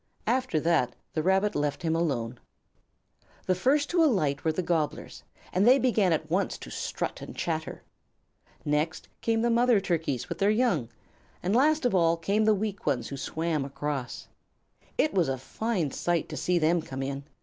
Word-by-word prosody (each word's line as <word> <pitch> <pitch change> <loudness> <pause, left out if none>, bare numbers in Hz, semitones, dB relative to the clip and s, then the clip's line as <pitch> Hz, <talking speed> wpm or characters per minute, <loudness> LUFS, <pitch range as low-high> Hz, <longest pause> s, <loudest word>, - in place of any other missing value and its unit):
After 245 -7 +1
that 160 -7 +1 0.2
the 155 - 0
Rabbit 190 +4 +2
left 145 +4 -1
him 165 -1 +1
alone. 125 -8 -1 1.1
The 185 - +2
first 275 +10 +2
to 345 -1 +4
alight 155 - +1
were 160 - +2
the 180 +4 -2
Gobblers, 160 -3 -2 0.3
and 190 +5 +3
they 255 +2 +8
began 220 -8 +2
at 155 -1 0
once 185 +5 0
to - - -10
strut - - -4
and - - -8
chatter. 160 -2 -3 0.8
Next 150 +3 -1
came 225 0 +1
the 235 - +2
mother 240 -1 +4
Turkeys 160 -9 -1
and - - -5
their 200 - +3
young, 210 - +1 0.5
and 190 +5 +1
last 300 +3 +3
of 245 - +2
all 170 -2 +3
came 200 +6 +1
the 215 -1 +5
weak 200 -3 -4
ones 125 -5 0
who 140 - -5
swam 160 +2 -2
across. 140 -2 -4 0.7
It 310 - +2
was 175 -7 +2
a 135 - -1
fine 175 - -2
sight 175 +1 -1
to - - -5
see 180 0 +1
them 170 +1 +2
come 135 -3 -5
in. 140 +1 -4
170 Hz, 180 wpm, -28 LUFS, 150-215 Hz, 1.1 s, they